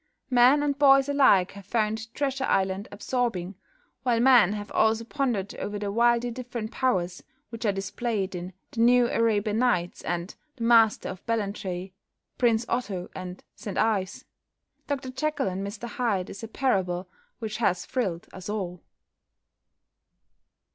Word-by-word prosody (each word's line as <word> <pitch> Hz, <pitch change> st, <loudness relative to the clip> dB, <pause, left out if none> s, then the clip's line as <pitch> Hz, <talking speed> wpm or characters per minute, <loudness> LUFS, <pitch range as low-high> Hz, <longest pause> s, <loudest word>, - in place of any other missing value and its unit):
Men 255 Hz, +4 st, +6 dB
and 285 Hz, -1 st, -1 dB
boys 275 Hz, -1 st, +6 dB
alike 265 Hz, -10 st, +4 dB
have 200 Hz, -1 st, -12 dB
found 220 Hz, 0 st, -1 dB
"Treasure 270 Hz, -2 st, -1 dB
Island" 190 Hz, +1 st, 0 dB
absorbing, 205 Hz, -4 st, -2 dB, 0.5 s
while 240 Hz, -3 st, +1 dB
men 240 Hz, -6 st, +6 dB
have 205 Hz, -1 st, -6 dB
also 220 Hz, +1 st, +2 dB
pondered 235 Hz, -7 st, -1 dB
over 205 Hz, 0 st, -4 dB
the 205 Hz, -1 st, -3 dB
widely 235 Hz, +2 st, +3 dB
different 235 Hz, -2 st, -5 dB
powers 185 Hz, -9 st, 0 dB, 0.3 s
which 230 Hz, 0 st, -6 dB
are -, -, +4 dB
displayed 195 Hz, 0 st, -2 dB
in 180 Hz, +1 st, -6 dB, 0.2 s
"The 230 Hz, -, -2 dB
New 245 Hz, 0 st, +5 dB
Arabian 215 Hz, -1 st, +1 dB
Nights" 200 Hz, -9 st, +1 dB
and 175 Hz, +2 st, -3 dB, 0.2 s
"The 235 Hz, -, -6 dB
Master 230 Hz, -2 st, +4 dB
of 185 Hz, -, -8 dB
Ballantrae," 195 Hz, -4 st, -2 dB, 0.5 s
"Prince 235 Hz, -2 st, +3 dB
Otto," 200 Hz, -7 st, -3 dB
and 185 Hz, 0 st, -7 dB
"St 205 Hz, -, -6 dB
Ives." 205 Hz, -4 st, 0 dB, 0.6 s
"Dr 270 Hz, -2 st, -3 dB
Jekyll 295 Hz, -1 st, -1 dB
and 190 Hz, +1 st, -3 dB
Mr 210 Hz, +3 st, -6 dB
Hyde" 210 Hz, -5 st, -1 dB
is 200 Hz, -, -9 dB
a -, -, -4 dB
parable 190 Hz, -8 st, 0 dB, 0.3 s
which 220 Hz, -2 st, -4 dB
has 180 Hz, -6 st, +1 dB
thrilled 195 Hz, -10 st, -2 dB
us 190 Hz, +1 st, -8 dB
all. 180 Hz, -5 st, -4 dB
220 Hz, 145 wpm, -27 LUFS, 190-245 Hz, 0.6 s, Men